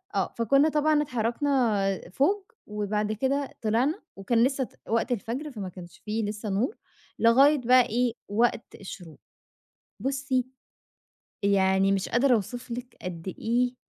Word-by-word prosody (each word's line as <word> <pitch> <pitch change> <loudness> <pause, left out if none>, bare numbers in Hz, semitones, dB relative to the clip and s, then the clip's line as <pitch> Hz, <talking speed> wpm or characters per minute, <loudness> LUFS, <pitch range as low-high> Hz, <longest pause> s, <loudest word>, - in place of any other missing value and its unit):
آه، - - 0
فكنا 275 +7 +4
طبعًا 300 0 +2
اتحرَّكنا 235 -6 0
فوق، 380 - +1 0.2
وبعد 210 0 -2
كده 270 +5 -1
طلَعنا، 245 - +1
وكان 230 +4 +1
لسه 265 +1 +1
ت - - -10 0.2
وقت 230 +2 0
الفجر، 245 +7 -3
فما 200 -7 -6
كانش 175 -2 -12
في 215 +2 -1
لسه 210 0 -4
نُور، 220 - 0 0.4
لغاية 270 +6 +6
بقى 250 0 +5
إيه 240 +1 +1
وقت 230 +2 0
الشُّروق. 175 -6 -10 0.8
بُصي، 265 0 -1 1.0
يعني 195 -1 +3
مش 195 0 -1
قادر 255 +2 +3
أوصِف 240 +4 -3
لِك 245 +1 -6
قد 180 -1 -6
إيه 245 +2 +1
235 Hz, 135 wpm, -27 LUFS, 205-265 Hz, 1.0 s, لغاية